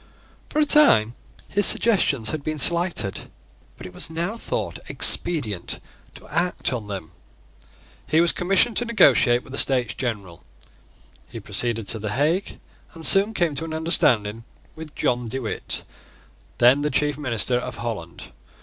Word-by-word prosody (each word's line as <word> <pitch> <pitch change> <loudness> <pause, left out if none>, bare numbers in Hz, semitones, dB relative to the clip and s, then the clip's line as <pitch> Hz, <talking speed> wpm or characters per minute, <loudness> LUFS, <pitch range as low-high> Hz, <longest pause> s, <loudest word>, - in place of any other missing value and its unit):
For - - -6
a 305 - +3
time 120 - +4 0.3
his 205 +1 +3
suggestions 140 - +2
had 155 -2 -5
been 155 +1 -4
slighted; 170 - +2 0.5
but - - -11
it 90 - -11
was - - -5
now 170 +6 -4
thought 230 - -5
expedient 115 - +2 0.4
to - - -15
act 175 -5 -2
on 115 -4 -6
them. 95 -5 -7 1.0
He 160 - +2
was 170 0 +3
commissioned 195 +6 +1
to 245 - 0
negotiate 125 - +3
with - - -15
the 140 - -3
States 125 -4 +1
General. 100 -9 -6 0.8
He - - -9
proceeded 115 -3 -3
to 110 - +1
the 105 0 -5
Hague, 155 - -1 0.4
and 165 -1 -2
soon 205 +3 +5
came 170 -5 0
to 145 +3 -4
an 160 -1 -6
understanding 115 - 0 0.3
with 160 -1 -11
John 120 -1 -2
De 125 +4 -5
Witt, 120 -5 -5 0.7
then 125 +4 +4
the 150 - -1
chief 150 -1 0
minister 125 -3 0
of - - -7
Holland. 105 - -7
140 Hz, 155 wpm, -22 LUFS, 115-170 Hz, 1.0 s, soon